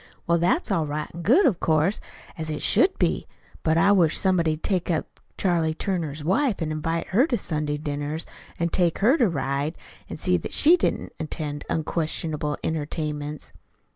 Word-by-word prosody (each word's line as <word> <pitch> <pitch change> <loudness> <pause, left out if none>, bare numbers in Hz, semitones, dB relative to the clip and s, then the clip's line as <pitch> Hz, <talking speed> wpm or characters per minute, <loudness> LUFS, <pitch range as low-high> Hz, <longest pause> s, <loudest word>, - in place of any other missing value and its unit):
Well, 170 0 +2
that's 185 - +1
all 165 -5 +1
right 150 +1 -3
an' 170 - -7
good, 255 - +4
of 200 -10 +2
course, 160 +5 +2 0.4
an' - - -7
as 160 - -3
it 150 -1 -3
should 375 +1 +3
be. - - 0 0.3
But 160 0 +2
I 195 +5 +5
wish 175 -6 +4
somebody'd 165 -5 +1
take 185 -3 -1
up 165 -3 -2 0.2
Charlie 165 -4 +1
Turner's 160 -6 -3
wife 215 - +1
an' 160 -2 -2
invite 165 +2 -2
her 245 +10 +3
to 245 - 0
Sunday 150 -5 -1
dinners 145 +1 -3 0.3
an' 170 0 0
take 170 -1 +1
her 235 +8 +4
to 235 -6 +4
ride, 140 +1 -2 0.3
an' - - -6
see 90 - +2
that 85 - -6
she 325 +4 +6
didn't - - -2
attend 150 -2 -4
unquestionable 155 -2 -2
entertainments." 150 -1 -4
160 Hz, 175 wpm, -25 LUFS, 150-185 Hz, 0.4 s, she